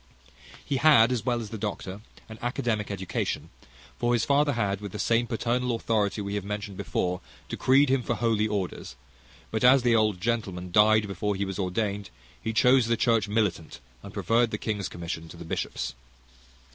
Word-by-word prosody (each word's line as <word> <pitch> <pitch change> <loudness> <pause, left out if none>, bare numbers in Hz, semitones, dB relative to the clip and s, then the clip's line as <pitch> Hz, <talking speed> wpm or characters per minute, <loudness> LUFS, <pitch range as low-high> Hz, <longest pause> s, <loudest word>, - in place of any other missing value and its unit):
He 140 - -1
had, 130 -6 +6
as 120 -5 -1
well 120 -1 +1
as 110 - -8
the 110 - -5
doctor, 100 -1 -5 0.3
an 110 -1 -10
academic 120 -3 -1
education; 95 -2 -3 0.5
for 120 0 +1
his 120 - +2
father 145 +1 +3
had, 100 -4 -1
with 100 -2 -7
the - - -4
same 115 +3 +1
paternal 120 +1 0
authority 110 -2 0
we 100 0 -4
have 105 -1 -2
mentioned 105 0 -5
before, 90 -1 -2 0.3
decreed 135 +2 +3
him 135 -1 +2
for 115 - -2
holy 110 -2 +1
orders; 95 -11 -4 0.6
but 110 +1 -1
as 125 +1 +6
the 120 -2 +4
old 105 -4 +2
gentleman 95 -5 -2
died 110 +2 +5
before 100 +1 -2
he 100 +1 -1
was 95 0 -5
ordained, 100 +2 -2 0.3
he 110 - -2
chose 125 +1 +4
the 115 0 +1
church 115 -3 +2
military, 105 -6 0 0.3
and - - -10
preferred 115 0 +2
the 105 - -3
king's 105 -3 -3
commission 85 -1 -6
to - - -11
the - - -9
bishop's. 65 +1 -3
110 Hz, 185 wpm, -27 LUFS, 100-120 Hz, 0.6 s, had